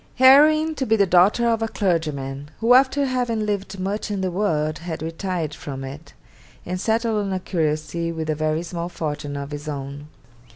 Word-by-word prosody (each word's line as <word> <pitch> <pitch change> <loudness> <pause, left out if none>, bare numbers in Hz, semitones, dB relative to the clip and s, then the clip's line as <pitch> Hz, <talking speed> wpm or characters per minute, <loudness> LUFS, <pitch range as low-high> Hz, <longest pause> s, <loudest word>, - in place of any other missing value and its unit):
'Heroine 305 +5 +6
to 275 -3 -3
be 220 - +4
the 200 -2 +4
daughter 190 +6 +4
of 225 -1 +1
a 225 - +1
clergyman, 150 -9 -2
who 230 +2 +4
after 270 +2 +4
having 245 -4 -1
lived 200 -2 -3
much 200 +4 -2
in 200 -2 -2
the 185 -1 -1
world 155 -5 0
had 165 -2 -5
retired 165 -1 -3
from 135 -3 -7
it, 140 +4 -9 0.5
and 180 +1 -3
settled 225 -1 +1
on - - -3
a 190 - -1
curacy 160 -1 -2
with 160 -1 -4
a 155 - +1
very 155 +2 -1
small 170 0 -4
fortune 145 -4 -4
of 140 +1 -6
his 145 +1 -6
own. 140 0 -6
175 Hz, 190 wpm, -22 LUFS, 155-220 Hz, 0.5 s, Heroine